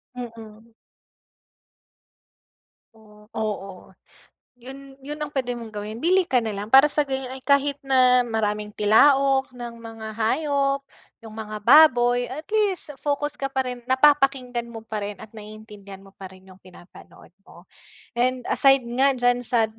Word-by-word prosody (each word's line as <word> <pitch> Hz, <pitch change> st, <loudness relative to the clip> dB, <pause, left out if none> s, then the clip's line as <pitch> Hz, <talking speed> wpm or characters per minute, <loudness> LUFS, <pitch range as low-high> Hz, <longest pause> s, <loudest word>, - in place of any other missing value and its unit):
Mm. 225 Hz, -2 st, -11 dB, 2.2 s
Oh, 210 Hz, -1 st, -20 dB
oo. 200 Hz, -4 st, -5 dB, 0.7 s
'Yon, 270 Hz, +2 st, -13 dB
'yon 295 Hz, +1 st, -6 dB
ang 300 Hz, -, -3 dB
puwede 250 Hz, -3 st, -2 dB
mong 230 Hz, -1 st, -9 dB
gawin. 210 Hz, +1 st, -6 dB
Bili 370 Hz, +2 st, +2 dB
ka 260 Hz, -7 st, +1 dB
nalang 210 Hz, -2 st, -5 dB
para 270 Hz, +2 st, +8 dB
sa 295 Hz, -, 0 dB
gano'n 265 Hz, -1 st, -4 dB
ay -, -, -14 dB
kahit 280 Hz, 0 st, +2 dB
na 255 Hz, -2 st, +4 dB
maraming 210 Hz, -2 st, -2 dB
tilaok 270 Hz, +5 st, +3 dB
ng 240 Hz, -1 st, -8 dB
mga 225 Hz, -1 st, -10 dB
hayop, 275 Hz, +3 st, 0 dB, 0.4 s
yung 220 Hz, -1 st, -12 dB
mga 215 Hz, -1 st, -6 dB
baboy, 245 Hz, -2 st, +5 dB
at 305 Hz, +5 st, -7 dB
least 400 Hz, -8 st, -1 dB
focus 290 Hz, +1 st, -2 dB
ka 275 Hz, 0 st, -3 dB
pa 265 Hz, -, +1 dB
rin, 250 Hz, -1 st, -6 dB
napapakinggan 260 Hz, -3 st, +2 dB
mo 225 Hz, -1 st, -9 dB
pa 215 Hz, -2 st, -5 dB
rin 205 Hz, -1 st, -7 dB
at 220 Hz, -, -11 dB
naiintindihan 210 Hz, -2 st, -12 dB
mo 195 Hz, -, -17 dB
pa 190 Hz, -1 st, -9 dB
rin 185 Hz, 0 st, -18 dB
yung 185 Hz, -, -16 dB
pinapanood 180 Hz, -1 st, -17 dB, 0.2 s
mo. -, -, -17 dB, 0.5 s
And 255 Hz, 0 st, 0 dB
aside 270 Hz, -1 st, +4 dB, 0.2 s
nga 275 Hz, +1 st, +4 dB
diyan 245 Hz, 0 st, +1 dB
sa 230 Hz, -2 st, +2 dB
245 Hz, 150 wpm, -23 LUFS, 215-275 Hz, 2.2 s, para